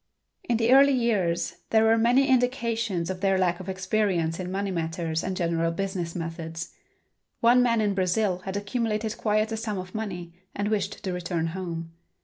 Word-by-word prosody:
In 235 - +3
the 230 +1 +2
early 280 +1 +7
years 200 -9 0
there 220 0 +4
were 225 0 +5
many 240 +4 +4
indications 230 - +1
of 185 -1 -6
their 195 -1 +3
lack 180 -2 +1
of 185 0 -7
experience 190 -3 0
in 180 -1 -4
money 195 +1 -2
matters 165 -1 -2
and 185 0 -3
general 165 -1 0
business 185 -2 -3
methods. 165 -1 -5 0.7
One 240 +2 +5
man 230 -2 +3
in 205 -2 +1
Brazil 185 0 +1
had 190 +1 -4
accumulated 220 0 -2
quite 215 0 +1
a 225 - -2
sum 215 -2 -3
of 185 0 -7
money 180 -6 -5 0.2
and 205 +1 -1
wished 205 -2 -2
to 185 - -2
return 170 -2 -2
home. 165 -2 -5
195 Hz, 175 wpm, -26 LUFS, 175-220 Hz, 0.7 s, early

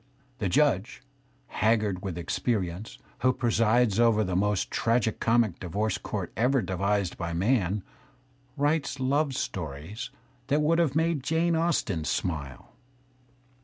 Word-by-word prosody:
The 100 - 0
judge, - - +1 0.4
haggard 105 -4 +1
with 95 -4 -4
experience, 95 +2 -2 0.2
who 130 - +3
presides 115 -2 +2
over 115 -2 +4
the 90 -3 -2
most 105 +1 0
tragi 115 -1 +2
comic 115 -5 +1
divorce 100 +3 -2
court 95 -5 -4
ever 125 +1 +2
devised 95 +1 -1
by 85 0 -3
man, 100 0 +1 0.7
writes 145 0 0
love 135 +1 +1
stories 85 - -5 0.4
that 150 +2 +2
would 165 +3 +3
have 155 -5 +1
made 160 -2 +1
Jane 165 +4 +1
Austen 160 - 0
smile. 70 -7 -3
110 Hz, 125 wpm, -27 LUFS, 95-130 Hz, 0.7 s, over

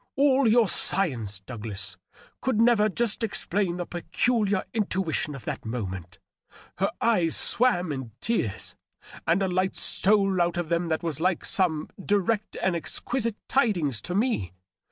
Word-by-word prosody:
All 275 -2 +4
your 230 +2 +6
sci 195 0 +1
ence, 105 -6 -5
Douglas, 105 -3 -6 0.5
could 260 -5 0
never 225 -2 +5
just 230 +2 +1
explain 195 -4 0
the 175 - -3
peculiar 205 +3 0
intuition 190 -8 -1
of 135 - -10
that - - -4
moment. 95 -6 -5 0.6
Her - - +2
eyes 180 -8 +2
swam 205 -9 +2
in 130 -4 -4
tears, 215 - -1 0.5
and 175 +4 +3
a - - +1
light 185 +1 0
stole 195 -2 +2
out 175 0 +1
of 175 -2 -2
them 170 0 +1
that 160 +1 -1
was 160 -4 -2
like 185 -1 +1
some 160 -5 +1 0.2
direct 205 +2 0
and 190 -2 +2
exquisite 230 +6 -1
tidings 175 - +1
to 180 - -4
me. 205 - 0
185 Hz, 150 wpm, -26 LUFS, 155-215 Hz, 0.6 s, your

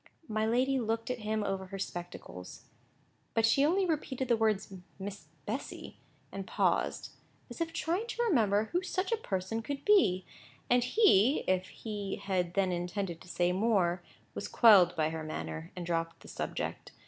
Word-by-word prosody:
My 215 -1 0
lady 260 +4 +2
looked 225 +1 -1
at 250 - -3
him 215 0 -1
over 190 -1 -2
her 195 +1 -6
spectacles: 175 - -7 0.7
but 225 - +4
she 275 +5 +4
only 370 +6 +3
repeated 270 -6 -2
the 235 - +5
words 215 -3 0 0.2
"Miss 200 +1 -7 0.2
Bessy," - - -6 0.3
and 195 -1 -6
paused, - - 0 0.4
as - - -7
if 330 0 -1
trying 350 +10 -1
to 475 0 -1
remember 220 - +2
who 355 - +1
such 375 +1 -2
a - - +4
person 205 - -3
could 275 +4 -5
be; 195 - +4 0.5
and 245 0 +5
he, 265 - +4
if 185 0 +1
he 205 -3 -5
had 180 -3 -2
then 195 -2 +2
intended 175 0 -3
to - - -14
say 175 0 +1
more, 185 -3 +2 0.3
was - - -4
quelled 195 -7 +6
by 155 -1 +1
her 160 -1 -4
manner, 80 - -5
and 180 - -5
dropped 165 -1 -2
the - - -13
subject. - - -4
205 Hz, 170 wpm, -31 LUFS, 180-250 Hz, 0.7 s, quelled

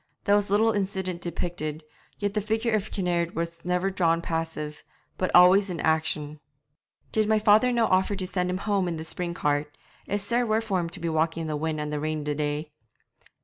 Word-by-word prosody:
There 205 - +4
was 205 -1 +1
little 220 +3 +4
incident 190 -3 -2
depicted, 165 -3 -4 0.3
yet 205 -1 -2
the 210 - 0
figure 220 +2 0
of 215 -1 0
Kinnaird 175 -3 -1
was 170 0 -4
never 180 +2 0
drawn 165 -3 +2
passive, 160 -2 -4 0.3
but 185 - -1
always 185 +3 +7
in 175 -2 -4
action. 155 -1 0 0.7
'Did 215 -1 +1
my 220 - +4
father 215 +4 +5
no' 235 -2 +3
offer 190 +1 +2
to 190 -1 -3
send 180 -1 -1
him 180 - -1
home 200 -3 +1
in 170 -2 -2
the 160 - -6
spring 175 +1 -4
cart? 145 -1 -1 0.3
It's 205 0 -1
sair 235 +4 +1
wet 220 -1 +1
for 195 -4 0
him 170 -1 -2
to 165 - -6
be 170 - -3
walking 160 +1 0
in 160 - -4
the 155 - -2
wind 155 +1 -2
and 150 0 -3
the 150 - -1
rain 155 0 -2
the 150 0 -1
day.' 150 +1 -2
180 Hz, 210 wpm, -26 LUFS, 160-205 Hz, 0.7 s, always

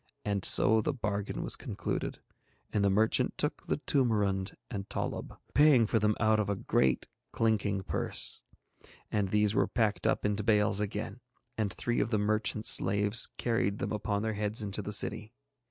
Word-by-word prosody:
And 100 -2 -1
so 110 +1 +6
the 145 +5 -2
bargain 105 -4 -3
was - - +2
concluded, - - -4 0.5
and 105 - +1
the 100 - +3
merchant 110 +3 +1
took - - -2
the - - 0
toomarund 105 -7 0 0.2
and 100 -2 -5
tollub, - - -4 0.2
paying 145 -6 +5
for 110 +1 +1
them 105 0 +1
out 110 0 +3
of 105 -2 -1
a 100 - 0
great 65 -7 0 0.3
clinking 105 -3 0
purse. - - -2 0.7
And 100 -2 0
these 105 0 +2
were - - +2
packed 105 -6 0
up - - 0
into 105 0 0
bales 105 -1 +3
again, 105 +3 -4 0.4
and 105 -3 -1
three 120 0 -2
of - - 0
the 110 - +1
merchant's 110 +1 +1
slaves 105 +3 +3
carried 115 -4 0
them - - -4
upon 105 -1 -2
their 110 0 -1
heads 105 +1 -2
into 100 +1 -3
the 105 - -6
city. 110 +2 -1
105 Hz, 170 wpm, -30 LUFS, 100-110 Hz, 0.7 s, so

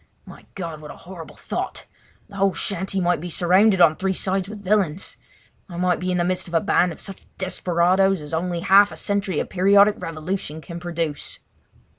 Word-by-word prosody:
My - - -14
God, 165 -5 -6
what 150 - -10
a - - -9
horrible 175 -3 -11
thought! - - -5 0.4
The 200 -2 -12
whole 195 -1 +2
shanty 195 -1 -3
might 175 -3 +1
be 175 - -5
surrounded 185 +4 +3
on 165 -3 +6
three 190 +1 -1
sides 190 +1 -1
with 210 -1 -9
villains! 190 -4 0 0.5
I 170 - -8
might 180 0 +1
be 185 - -3
in 180 - 0
the 175 - +1
midst 180 +1 -1
of 170 - -5
a - - +5
band 180 +2 +2
of 160 - -10
such 195 -2 -7
desperadoes 185 +1 +1
as 150 +1 -8
only 170 +1 -2
half 195 +2 +5
a - - -8
century 200 -5 -1
of - - -3
periodic 200 +2 +5
revolution 165 -1 -4
can 170 +2 -8
produce. 165 -4 -4
180 Hz, 195 wpm, -22 LUFS, 170-195 Hz, 0.5 s, on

